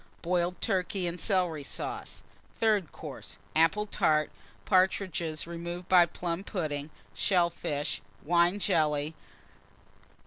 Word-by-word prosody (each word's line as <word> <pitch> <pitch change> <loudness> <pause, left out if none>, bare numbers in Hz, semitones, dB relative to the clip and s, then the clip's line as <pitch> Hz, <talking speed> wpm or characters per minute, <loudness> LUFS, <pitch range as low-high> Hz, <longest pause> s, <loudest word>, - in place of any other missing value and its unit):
Boiled 175 +1 0
Turkey 190 -2 0
and 170 0 -3
Celery 180 -7 +1
Sauce. - - -6 0.4
Third 210 -7 +2
Course. - - -9 0.2
Apple 165 +7 +4
Tart. 155 -7 +2 0.3
Partridges, 185 -4 +1
Shell - - -2
Fish. - - -10
removed 170 +1 -6
by 180 -2 +7
Plum 175 +1 -3
pudding. 155 -7 -3 1.4
Wine 175 +4 +4
Jelly. 155 -5 +1
175 Hz, 105 wpm, -30 LUFS, 160-185 Hz, 1.4 s, by